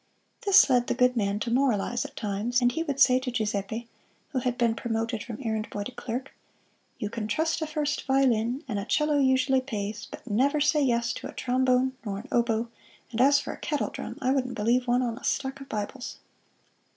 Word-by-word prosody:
This 395 Hz, -, +8 dB
led 245 Hz, -3 st, +3 dB
the -, -, 0 dB
good 250 Hz, 0 st, +3 dB
man 200 Hz, -3 st, 0 dB
to 230 Hz, -, -2 dB
moralize 240 Hz, -2 st, +1 dB
at -, -, -9 dB
times, 215 Hz, +4 st, 0 dB
and 245 Hz, -1 st, +3 dB
he 325 Hz, -, -2 dB
would 285 Hz, -5 st, -3 dB
say 255 Hz, -2 st, +6 dB
to 260 Hz, 0 st, -4 dB
Giuseppe, 220 Hz, 0 st, -2 dB, 0.4 s
who 260 Hz, -, -1 dB
had 245 Hz, -1 st, -1 dB
been 235 Hz, -2 st, +2 dB
promoted 225 Hz, 0 st, -2 dB
from 225 Hz, 0 st, -7 dB
errand 220 Hz, -1 st, -2 dB
boy 205 Hz, -, -4 dB
to 230 Hz, -, -6 dB
clerk: 245 Hz, +2 st, -5 dB, 0.6 s
"You 210 Hz, -, -3 dB
can 225 Hz, -2 st, -3 dB
trust 320 Hz, +9 st, 0 dB
a 315 Hz, -, -1 dB
first 300 Hz, -2 st, -2 dB
violin, 260 Hz, 0 st, +2 dB
and 210 Hz, -5 st, -2 dB
a 200 Hz, -, -4 dB
'cello 300 Hz, +3 st, +2 dB
usually 260 Hz, 0 st, +3 dB
pays, 215 Hz, -5 st, -4 dB
but -, -, -10 dB
never 265 Hz, +7 st, +2 dB
say 295 Hz, +1 st, +3 dB
yes 235 Hz, -3 st, +1 dB
to -, -, -6 dB
a -, -, -10 dB
trombone 255 Hz, +1 st, +2 dB
nor 200 Hz, -3 st, -3 dB
an 220 Hz, +7 st, -8 dB
oboe; 235 Hz, -1 st, +1 dB, 0.4 s
and 240 Hz, +1 st, 0 dB
as 280 Hz, +2 st, +6 dB
for -, -, -5 dB
a -, -, -11 dB
kettle 295 Hz, -2 st, -1 dB
drum, -, -, -6 dB
I 255 Hz, -, +3 dB
wouldn't 255 Hz, -2 st, 0 dB
believe 240 Hz, +4 st, +1 dB
one 245 Hz, +1 st, +3 dB
on 235 Hz, 0 st, -3 dB
a -, -, -19 dB
stack 270 Hz, 0 st, -1 dB
of 275 Hz, -, -10 dB
Bibles!" 215 Hz, +5 st, -5 dB
245 Hz, 210 wpm, -27 LUFS, 225-265 Hz, 0.6 s, This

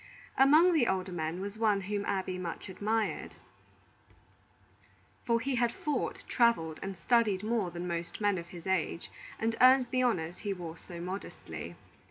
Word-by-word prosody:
Among 310 Hz, +7 st, +6 dB
the 280 Hz, -8 st, +3 dB
older 190 Hz, 0 st, -1 dB
men 165 Hz, +1 st, -3 dB
was 200 Hz, +2 st, -6 dB
one 210 Hz, -3 st, +3 dB
whom 200 Hz, +1 st, -2 dB
Abby 185 Hz, -2 st, -2 dB
much 175 Hz, +2 st, -5 dB
admired; 215 Hz, +3 st, -1 dB, 1.9 s
for 230 Hz, -1 st, +2 dB
he 265 Hz, +3 st, -2 dB
had 240 Hz, -1 st, +2 dB
fought, 290 Hz, +1 st, -2 dB
travelled, 200 Hz, -10 st, +2 dB
and 195 Hz, -1 st, -5 dB
studied 215 Hz, -4 st, +2 dB
more 220 Hz, -4 st, 0 dB
than 175 Hz, +1 st, -6 dB
most 170 Hz, -1 st, -4 dB
men 205 Hz, -3 st, +2 dB
of 170 Hz, -, -8 dB
his 175 Hz, -2 st, -11 dB
age, 190 Hz, -2 st, -1 dB, 0.3 s
and 225 Hz, +1 st, 0 dB
earned 255 Hz, 0 st, +7 dB
the 255 Hz, -, +2 dB
honors 175 Hz, -9 st, 0 dB
he 200 Hz, -, -2 dB
wore 170 Hz, -3 st, -7 dB
so 170 Hz, +1 st, -10 dB
modestly. 185 Hz, +3 st, -6 dB
200 Hz, 160 wpm, -31 LUFS, 175-235 Hz, 1.9 s, earned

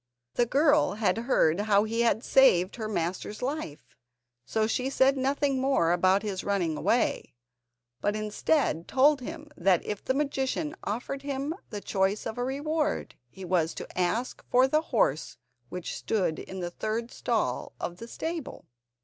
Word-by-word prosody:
The 240 Hz, -, +2 dB
girl 290 Hz, -, +3 dB
had 205 Hz, -3 st, +1 dB
heard 220 Hz, -8 st, +2 dB
how 205 Hz, -1 st, +3 dB
he 225 Hz, +2 st, -1 dB
had 235 Hz, 0 st, +2 dB
saved 190 Hz, -8 st, +4 dB
her 220 Hz, -2 st, -3 dB
master's 195 Hz, +3 st, -3 dB
life, 265 Hz, -, -5 dB, 0.5 s
so 220 Hz, -1 st, +1 dB
she 250 Hz, +4 st, -1 dB
said 270 Hz, 0 st, +3 dB
nothing 270 Hz, 0 st, 0 dB
more 265 Hz, -11 st, +2 dB
about 185 Hz, +3 st, +3 dB
his 200 Hz, -3 st, -3 dB
running 185 Hz, -6 st, 0 dB
away, 230 Hz, -, 0 dB, 0.7 s
but 205 Hz, -, 0 dB
instead 215 Hz, -, 0 dB
told 280 Hz, +1 st, +4 dB
him 305 Hz, +2 st, -8 dB
that 180 Hz, -1 st, +2 dB
if 210 Hz, -1 st, -4 dB
the 260 Hz, -, 0 dB
magician 290 Hz, +2 st, -1 dB
offered 245 Hz, +6 st, -3 dB
him 280 Hz, +2 st, -3 dB, 0.2 s
the 205 Hz, -2 st, -5 dB
choice 195 Hz, +2 st, 0 dB
of 220 Hz, -, -4 dB
a -, -, 0 dB
reward, 300 Hz, +4 st, -1 dB, 0.2 s
he 190 Hz, +8 st, -10 dB
was 170 Hz, -2 st, +1 dB
to -, -, -6 dB
ask 210 Hz, +8 st, -1 dB
for 255 Hz, +1 st, +5 dB
the 305 Hz, +3 st, +2 dB
horse 200 Hz, -, 0 dB, 0.3 s
which 180 Hz, -1 st, -5 dB
stood 185 Hz, -7 st, -1 dB
in 190 Hz, 0 st, -7 dB
the 175 Hz, 0 st, -3 dB
third 220 Hz, +5 st, -3 dB
stall -, -, -1 dB
of 175 Hz, -, -4 dB
the 230 Hz, -, -9 dB
stable. 325 Hz, +4 st, -5 dB
225 Hz, 160 wpm, -28 LUFS, 190-270 Hz, 0.7 s, for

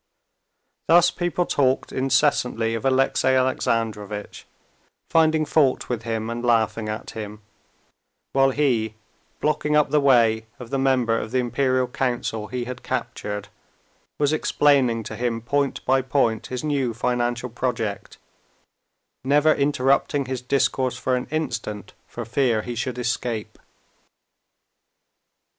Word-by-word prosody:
Thus 175 Hz, +2 st, +6 dB
people 175 Hz, 0 st, -1 dB
talked 130 Hz, -4 st, +1 dB
incessantly 130 Hz, -4 st, +1 dB
of 115 Hz, +3 st, -4 dB
Alexey 135 Hz, 0 st, +2 dB
Alexandrovitch, 110 Hz, -5 st, -1 dB, 0.6 s
finding 160 Hz, -1 st, +3 dB
fault 145 Hz, -4 st, +2 dB
with 120 Hz, -3 st, -2 dB
him 110 Hz, -1 st, -3 dB
and 115 Hz, +1 st, -4 dB
laughing 110 Hz, -2 st, +1 dB
at 110 Hz, +1 st, -5 dB
him, 105 Hz, -1 st, -8 dB, 0.9 s
while 135 Hz, 0 st, +4 dB
he, 120 Hz, -6 st, 0 dB, 0.5 s
blocking 150 Hz, 0 st, +1 dB
up 150 Hz, -1 st, +3 dB
the 150 Hz, -, +3 dB
way 115 Hz, -5 st, +3 dB
of 120 Hz, -2 st, -10 dB
the 135 Hz, -, 0 dB
member 130 Hz, -4 st, +2 dB
of 110 Hz, -, -5 dB
the 130 Hz, -, -1 dB
Imperial 130 Hz, +1 st, +1 dB
Council 120 Hz, -4 st, -2 dB
he 125 Hz, +1 st, -3 dB
had 125 Hz, 0 st, -7 dB
captured, 105 Hz, -5 st, -4 dB, 0.7 s
was 145 Hz, 0 st, +1 dB
explaining 135 Hz, -7 st, +2 dB
to -, -, -7 dB
him 120 Hz, -1 st, -1 dB
point 140 Hz, +4 st, -1 dB
by 135 Hz, +1 st, +3 dB
point 125 Hz, -4 st, 0 dB
his 125 Hz, +1 st, -5 dB
new 135 Hz, -6 st, -1 dB
financial 120 Hz, 0 st, -1 dB
project, 115 Hz, -5 st, -3 dB, 1.1 s
never 145 Hz, +3 st, +4 dB
interrupting 140 Hz, 0 st, +1 dB
his 130 Hz, -1 st, -4 dB
discourse 130 Hz, 0 st, 0 dB
for 130 Hz, -, 0 dB
an 125 Hz, -, -3 dB
instant 115 Hz, -9 st, -4 dB
for 120 Hz, -, -7 dB
fear 115 Hz, -2 st, +1 dB
he 120 Hz, -, -5 dB
should 125 Hz, +2 st, -3 dB
escape. 120 Hz, -2 st, -3 dB
125 Hz, 125 wpm, -23 LUFS, 115-140 Hz, 1.1 s, Thus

